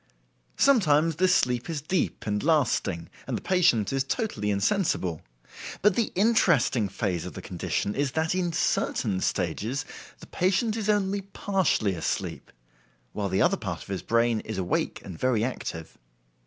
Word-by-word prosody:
Sometimes 165 Hz, -, +4 dB
this 185 Hz, 0 st, +4 dB
sleep 125 Hz, +3 st, 0 dB
is 160 Hz, -3 st, -2 dB
deep 165 Hz, +5 st, -2 dB
and 105 Hz, -1 st, -1 dB
lasting, 110 Hz, -, +1 dB, 0.2 s
and -, -, -1 dB
the -, -, -7 dB
patient 150 Hz, -, +2 dB
is 135 Hz, -1 st, +1 dB
totally 135 Hz, -, -2 dB
insensible; 100 Hz, -, 0 dB, 0.6 s
but 205 Hz, -2 st, +5 dB
the 230 Hz, -, 0 dB
interesting 175 Hz, -, +3 dB
phase 95 Hz, -4 st, -2 dB
of -, -, -7 dB
the -, -, -7 dB
condition 100 Hz, -, -2 dB
is 140 Hz, 0 st, -1 dB
that 160 Hz, +1 st, 0 dB
in 180 Hz, -2 st, 0 dB
certain 110 Hz, -, 0 dB
stages 105 Hz, -, -1 dB, 0.3 s
the -, -, -12 dB
patient 195 Hz, +5 st, 0 dB
is 215 Hz, -2 st, -2 dB
only 200 Hz, -1 st, +1 dB
partially 190 Hz, -, 0 dB
asleep, 80 Hz, -3 st, -3 dB, 0.6 s
while 100 Hz, -2 st, -2 dB
the 95 Hz, -, +2 dB
other -, -, +3 dB
part -, -, -5 dB
of -, -, -17 dB
his 95 Hz, -2 st, -3 dB
brain 115 Hz, -1 st, +2 dB
is 110 Hz, -1 st, -6 dB
awake 90 Hz, -2 st, -1 dB
and 90 Hz, -4 st, -8 dB
very 125 Hz, -4 st, +1 dB
active. 80 Hz, -9 st, -5 dB
135 Hz, 155 wpm, -27 LUFS, -, 0.6 s, but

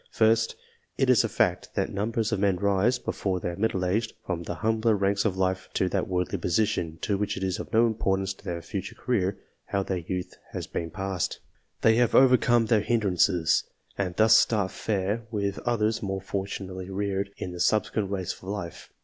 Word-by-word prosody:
First, 115 Hz, 0 st, +2 dB, 0.4 s
it -, -, +4 dB
is -, -, +5 dB
a -, -, -1 dB
fact, -, -, 0 dB
that -, -, 0 dB
numbers 110 Hz, +2 st, -1 dB
of 105 Hz, -, 0 dB
men 100 Hz, -2 st, +3 dB
rise, 100 Hz, +6 st, +2 dB
before 95 Hz, -6 st, -2 dB
they 90 Hz, -, -3 dB
are 85 Hz, -, -5 dB
middle 95 Hz, -2 st, 0 dB
aged, 110 Hz, +5 st, 0 dB
from__the_Jmmbler 105 Hz, +6 st, 0 dB
ranks 100 Hz, +1 st, +1 dB
of 95 Hz, -3 st, 0 dB
life 95 Hz, 0 st, 0 dB
to 95 Hz, -, +2 dB
that 95 Hz, -1 st, -1 dB
worldly 90 Hz, +1 st, -1 dB
position, 85 Hz, -3 st, 0 dB
in 100 Hz, -2 st, +1 dB
which 105 Hz, -, -1 dB
it 95 Hz, -, -4 dB
is 95 Hz, -1 st, -1 dB
of -, -, -7 dB
no 115 Hz, +1 st, +5 dB
importance 95 Hz, -4 st, 0 dB
to -, -, -21 dB
tEeir 85 Hz, -1 st, -3 dB, 0.4 s
future^career, 100 Hz, -6 st, 0 dB, 0.3 s
how 100 Hz, 0 st, -1 dB
their 95 Hz, -1 st, -2 dB
youth 90 Hz, +2 st, -4 dB, 0.2 s
has -, -, -4 dB
been 85 Hz, -, -4 dB
passed^ 95 Hz, 0 st, -2 dB, 0.5 s
They 110 Hz, 0 st, +5 dB
have 120 Hz, -2 st, +3 dB
overcorrre 120 Hz, -3 st, +5 dB
their 110 Hz, -2 st, +3 dB
hindrances, 95 Hz, -6 st, +2 dB, 0.3 s
and 90 Hz, -3 st, -2 dB
thus 110 Hz, +1 st, +6 dB
start 105 Hz, -4 st, +3 dB
fair 105 Hz, +2 st, -2 dB
with 100 Hz, -3 st, -2 dB
others 110 Hz, -2 st, +1 dB
more 95 Hz, -1 st, -2 dB
fortunately 95 Hz, -1 st, -5 dB
reared, 100 Hz, 0 st, -2 dB
in 90 Hz, -, -5 dB
the 90 Hz, -, -8 dB
subsequent 105 Hz, 0 st, +1 dB
race 95 Hz, -2 st, -2 dB
of -, -, -17 dB
life. 95 Hz, -3 st, -6 dB
100 Hz, 185 wpm, -27 LUFS, 95-110 Hz, 0.5 s, thus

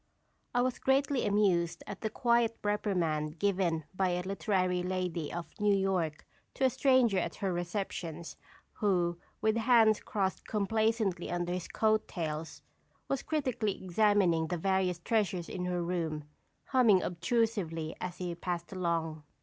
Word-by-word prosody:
I 245 Hz, -, +4 dB
was 255 Hz, -1 st, -1 dB
greatly 270 Hz, 0 st, +2 dB
amused 190 Hz, -5 st, +2 dB
at 200 Hz, -, -7 dB
the 220 Hz, -, -1 dB
quiet 235 Hz, -1 st, +2 dB
reprimand 170 Hz, -7 st, 0 dB
given 180 Hz, -4 st, +1 dB
by 185 Hz, 0 st, +1 dB
a 180 Hz, 0 st, -1 dB
literary 185 Hz, -2 st, 0 dB
lady 180 Hz, -4 st, -2 dB
of 175 Hz, 0 st, -6 dB
New 210 Hz, -1 st, +4 dB
York 185 Hz, -6 st, 0 dB, 0.3 s
to -, -, -2 dB
a 260 Hz, -, +4 dB
stranger 255 Hz, -7 st, +3 dB
at -, -, -3 dB
her 195 Hz, -3 st, -1 dB
receptions, 175 Hz, -2 st, -4 dB, 0.4 s
who, 175 Hz, -4 st, +1 dB, 0.2 s
with 220 Hz, +1 st, +2 dB
hands 225 Hz, -2 st, +5 dB
crossed 195 Hz, -3 st, -2 dB
complacently 215 Hz, -3 st, 0 dB
under 175 Hz, 0 st, -1 dB
his 180 Hz, -1 st, -4 dB
coat 220 Hz, 0 st, +1 dB
tails, 160 Hz, -3 st, -5 dB, 0.4 s
was 275 Hz, -, -1 dB
critically 255 Hz, -9 st, -1 dB
examining 185 Hz, -4 st, +3 dB
the 175 Hz, +2 st, -2 dB
various 190 Hz, 0 st, +1 dB
treasures 190 Hz, -3 st, 0 dB
in 180 Hz, -, -4 dB
her 180 Hz, -1 st, -1 dB
room, 165 Hz, -3 st, -2 dB, 0.5 s
humming 230 Hz, -8 st, +5 dB
obtrusively 180 Hz, -4 st, -1 dB
as 180 Hz, -2 st, -4 dB
he 180 Hz, -2 st, -3 dB
passed 170 Hz, +1 st, -4 dB
along. 165 Hz, -4 st, -1 dB
185 Hz, 140 wpm, -31 LUFS, 170-215 Hz, 0.5 s, hands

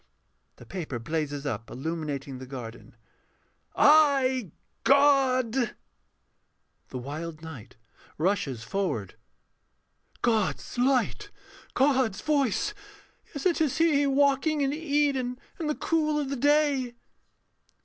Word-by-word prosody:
[The -, -, -14 dB
paper 165 Hz, -9 st, -5 dB
blazes 145 Hz, +2 st, -3 dB
up, 115 Hz, -5 st, -4 dB
illuminating 140 Hz, -2 st, -4 dB
the 130 Hz, -, -9 dB
garden.] 120 Hz, -4 st, -9 dB, 0.8 s
I, 275 Hz, -, +4 dB, 0.3 s
God... 265 Hz, -4 st, +3 dB, 1.1 s
THE -, -, -6 dB
WILD 155 Hz, +5 st, -6 dB
KNIGHT 140 Hz, -13 st, -10 dB, 0.4 s
[rushes 150 Hz, -, -1 dB
forward]. 120 Hz, -, -2 dB, 1.1 s
God's 225 Hz, +1 st, 0 dB
Light! 265 Hz, -, +1 dB, 0.5 s
God's 260 Hz, -6 st, +2 dB
Voice; 290 Hz, -, +1 dB, 0.5 s
yes, 285 Hz, +1 st, -7 dB
it 345 Hz, -3 st, +2 dB
is 300 Hz, -2 st, +1 dB
He 300 Hz, -4 st, +3 dB
Walking 280 Hz, +2 st, +2 dB
in 275 Hz, 0 st, +1 dB
Eden 285 Hz, -5 st, 0 dB, 0.2 s
in 320 Hz, -, -2 dB
the 300 Hz, -, 0 dB
cool 305 Hz, -2 st, 0 dB
of 280 Hz, -2 st, -3 dB
the -, -, -1 dB
day! 285 Hz, -2 st, +2 dB
255 Hz, 105 wpm, -27 LUFS, -, 1.1 s, I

